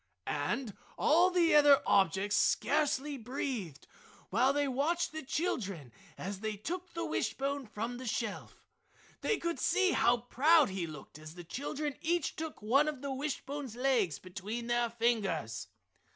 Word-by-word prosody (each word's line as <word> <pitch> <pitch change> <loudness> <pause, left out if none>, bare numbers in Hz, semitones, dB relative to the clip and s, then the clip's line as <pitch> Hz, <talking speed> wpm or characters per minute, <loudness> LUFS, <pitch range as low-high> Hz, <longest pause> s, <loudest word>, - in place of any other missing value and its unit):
And 215 - -2 0.2
all 345 +4 +5
the 350 -2 +3
other 290 -2 +7
objects 195 +2 +2
scarcely 290 +1 +1
breathed 230 - -4 0.5
while 245 +7 +4
they 285 0 +1
watched 295 +7 0
the 315 0 -5
children 200 - -3 0.3
as 195 +1 -5
they 215 0 -3
took 350 - -5
the 335 - -2
wishbone 275 -1 -2
from 230 +4 -4
the 255 - -6
shelf. 220 -1 -4 0.6
They 440 - +1
could 340 -1 -3
see 380 -1 +3
how 240 +1 +4
proud 275 +4 +4
he 190 -3 -3
looked 155 -1 -10
as 155 +1 -11
the 175 - -9
children 285 - -4
each 340 -1 0
took 315 -8 -6
one 275 +8 +4
of 290 -3 -4
the 280 -1 -2
wishbone's 280 -2 -4
legs 245 - +1
between 200 +6 -6
their 240 0 +1
fingers. 200 - -1
250 Hz, 150 wpm, -32 LUFS, 205-295 Hz, 0.6 s, other